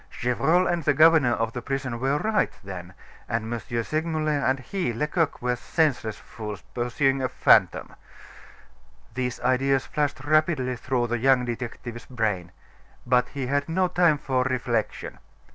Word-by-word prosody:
Gevrol 155 +9 +2
and 175 -2 0
the 145 -1 +2
governor 155 -5 +6
of 115 -1 -1
the 125 - -4
prison 130 -2 -3
were 135 +3 +1
right, 215 +6 +1
then, 90 -2 -8 0.3
and 115 0 -2
M. 120 - -2 0.2
Segmuller 155 +2 -1
and 135 -1 +1
he, 175 -1 -3
Lecoq, 150 +5 -1
were 125 0 +1
senseless 125 -5 0
fools, 105 -3 -8
pursuing 135 +3 0
a 130 - 0
fantom. - - +3 1.2
These 125 0 -3
ideas 130 +1 +2
flashed 145 -3 -2
rapidly 155 -4 +2
through 125 0 -1
the 120 0 -2
young 130 0 +3
detective's 120 0 -6
brain. 105 -8 -2 0.5
But 125 0 +3
he 140 -2 -4
had 140 +3 -1
no 185 +3 +2
time 175 -4 +3
for 130 -2 -1
reflection. 120 -4 -2
130 Hz, 145 wpm, -25 LUFS, 120-150 Hz, 1.2 s, governor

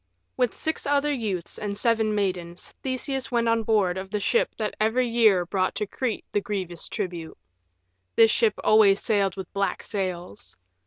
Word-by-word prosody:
With 250 -2 0
six 315 -2 -3
other 290 +1 +2
youths 205 -9 -4
and 205 -1 -3
seven 220 -1 +2
maidens 180 -4 -3
Theseus 265 0 -2
went 235 -1 +1
on 230 0 +2
board 205 -5 +1
of 190 0 -7
the 210 +1 -2
ship 205 - +2
that 215 -2 -2
every 240 +4 +2
year 220 -6 +4
brought 185 +1 -1
to 210 - -1
Crete 235 +2 -3
the 205 - +1
grievous 185 -5 -2
tribute. 175 -6 -5 0.8
This 225 -1 +6
ship 220 -2 +2
always 210 -2 +5
sailed 200 -4 +1
with 190 -2 -7
black 200 0 -1
sails. 180 - -5
210 Hz, 165 wpm, -25 LUFS, 190-230 Hz, 0.8 s, This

